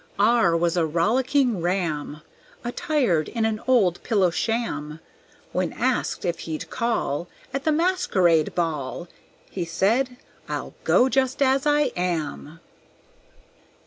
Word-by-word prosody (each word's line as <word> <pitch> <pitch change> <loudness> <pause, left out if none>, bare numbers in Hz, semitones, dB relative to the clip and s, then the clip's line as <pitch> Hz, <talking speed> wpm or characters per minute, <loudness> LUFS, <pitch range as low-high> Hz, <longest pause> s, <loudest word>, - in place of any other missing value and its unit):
R 205 -5 +4
was 170 0 +1
a 175 - +2
rollicking 235 - +1
Ram, 165 -5 -2 0.4
Attired 245 - 0
in 230 -2 -1
an 220 0 -1
old 205 -9 +3
pillow 195 -6 +2
sham. 160 -9 -2 0.5
When - - -1
asked - - -1
if 170 -1 -1
he'd 160 -1 -6
call 225 - -1 0.3
At 275 +1 -3
the 315 - +3
masquerade 200 - +2
ball, 165 -1 -2 0.4
He 185 - -3
said, 230 +10 0 0.3
"I'll - - -4
go 250 - +5
just 265 0 0
as 270 +2 +2
I 295 0 +3
am." 165 -3 -3
195 Hz, 120 wpm, -24 LUFS, 165-255 Hz, 0.5 s, go